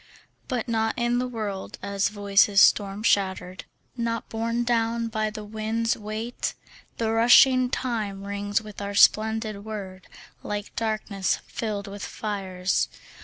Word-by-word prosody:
But 250 -4 -2
not 225 -1 0
in 240 0 +1
the 250 - -1
world 210 -5 -5
as 200 0 0
voices 200 -1 +3
storm 200 +1 +4
shatter'd, 190 -3 0 0.3
Not 230 -1 -2
borne 230 +1 -1
down 230 -1 0
by 215 -1 -1
the 215 0 -7
wind's 220 +2 -1
weight; 220 +3 -4 0.4
The 225 -1 0
rushing 250 +3 +6
time 215 -7 -3
rings 200 +2 -2
with 210 -1 -9
our 200 0 -4
splendid 215 0 +3
word 195 -4 -7 0.3
Like 205 -1 -5
darkness 215 -3 -1
filled 210 -3 -4
with 200 -1 -8
fires. 190 -3 -2
215 Hz, 130 wpm, -25 LUFS, 200-230 Hz, 0.4 s, rushing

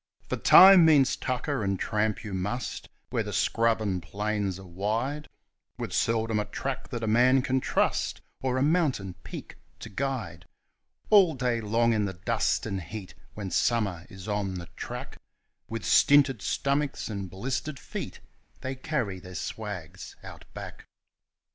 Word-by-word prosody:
For - - -1
time 190 -2 +9
means 150 -5 +5
tucker, 130 0 -2
and 100 -1 -1
tramp 105 0 -1
you 105 -3 -6
must, 105 +7 -3 0.2
where - - +1
the - - -4
scrubs 115 -1 +1
and 95 -4 -1
plains 100 +1 -2
are 95 - -11
wide, 110 - -2 0.5
With - - -5
seldom 115 -1 +1
a 105 - -1
track 135 -1 -4
that 120 -4 -4
a - - -1
man 125 +4 +4
can 130 +1 +1
trust, - - 0 0.2
or 130 -1 0
a 130 - +2
mountain 145 - +1
peak 85 - -9 0.2
to - - -9
guide; 105 -8 -4 0.6
All 190 -7 +6
day 125 -2 0
long 115 +2 +2
in 105 -2 +1
the 95 - -3
dust 100 +4 0
and 100 -3 -3
heat 100 +1 -8 0.2
when 100 -3 -5
summer 100 -7 0
is 95 -2 -10
on 100 -2 -1
the 85 -1 -6
track - - -7 0.5
With 115 +1 -4
stinted 140 -5 +5
stomachs 140 +8 -1
and 100 -3 -5
blistered 130 - -3
feet, - - -7 0.4
they 130 0 -3
carry 130 - -2
their 90 0 -11
swags 105 -4 -6
Out - - -11
Back. - - -9
110 Hz, 155 wpm, -28 LUFS, 100-130 Hz, 0.6 s, time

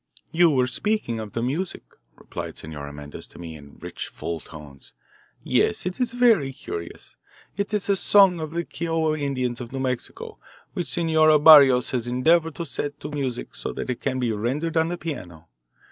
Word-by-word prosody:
"You 170 0 +5
were 130 -4 +3
speaking 135 - -2
of 110 -2 -7
the 115 - -2
music," 160 +9 -3 0.3
replied - - -7
Senora 75 -2 -8
Mendez 75 0 -9
to - - -16
me 85 -2 -8
in 70 -1 -14
rich, - - -6
full 85 -1 -5
tones. 75 -4 -13 0.5
"Yes, 85 - +1
it 180 +4 -4
is 240 -1 0
very 230 - +4
curious. 85 -9 -8 0.4
It 200 +2 -2
is 210 -3 -1
a 200 - +3
song 195 -2 +5
of 155 -1 -4
the 170 +2 -3
Kiowa 165 -2 -1
Indians 130 -4 -2
of 120 - -8
New 135 - -4
Mexico 130 -2 -4 0.3
which 175 - -3
Senora 160 -2 +4
Barrios 140 -5 +8
has 120 -2 -2
endeavoured 160 +6 +2
to 170 - -4
set 145 +1 -5
to 150 - -6
music 135 -4 -4
so - - -5
that - - -3
it 125 - -5
can 130 -2 -1
be 125 -3 0
rendered 135 +10 -2
on 160 0 +3
the 175 +1 -3
piano. 90 - -7
140 Hz, 185 wpm, -24 LUFS, 115-165 Hz, 0.5 s, Barrios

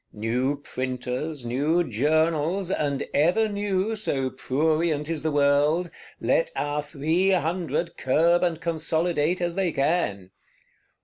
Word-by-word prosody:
New 125 +6 -1
Printers, 130 +2 -4
new 145 +8 +1
Journals, 160 - +1
and 145 -6 -1
ever 180 +9 +3
new 205 0 -1
(so 135 -11 -1
prurient 155 +3 0
is 160 -3 -2
the 160 - 0
world), 145 +4 +2 0.3
let - - +1
our 145 0 -1
Three 160 +5 0
Hundred 170 -1 -1
curb 165 +6 +3
and 170 -3 0
consolidate 165 0 0
as 175 -1 -1
they 185 -1 0
can! 135 - -1
160 Hz, 120 wpm, -25 LUFS, 140-175 Hz, 0.3 s, ever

